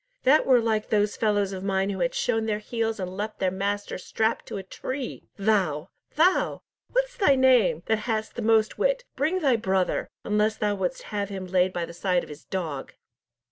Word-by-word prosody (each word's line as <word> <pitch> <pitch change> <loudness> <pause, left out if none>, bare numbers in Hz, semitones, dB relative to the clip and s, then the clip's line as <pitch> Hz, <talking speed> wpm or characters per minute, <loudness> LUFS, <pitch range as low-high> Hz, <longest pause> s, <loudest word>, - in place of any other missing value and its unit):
"That 285 +4 +5
were 255 -2 +6
like 220 -2 0
those 210 -1 +2
fellows 205 -3 +1
of 190 0 -5
mine 195 0 0
who 190 - -4
have 170 -1 0
shown 225 -2 0
their 210 -1 0
heels 225 +1 -2
and 185 0 -4
left 210 +2 -4
their 185 -1 0
master 200 +1 -2
strapped 220 +4 -1
to - - -5
a 195 - -5
tree! 255 +7 -6
Thou! 190 -7 +1 0.2
thou! 355 +5 +2 0.3
what's - - 0
thy 385 - +4
name, 240 -11 +4
that 220 -1 +1
hast 220 -1 -1
the 240 - -5
most 220 -1 +2
wit, - - +2
bring 320 +7 0
thy 265 -6 +3
brother, 190 -3 0
unless 210 +1 +1
thou 210 -1 +1
wouldst 190 -3 -2
have 205 -1 -1
him 190 -2 -5
laid 185 0 +2
by 175 -2 -2
the 170 - -10
side 180 0 0
of - - -11
his 150 0 -11
dog." 160 -8 -4
210 Hz, 200 wpm, -26 LUFS, 190-230 Hz, 0.3 s, were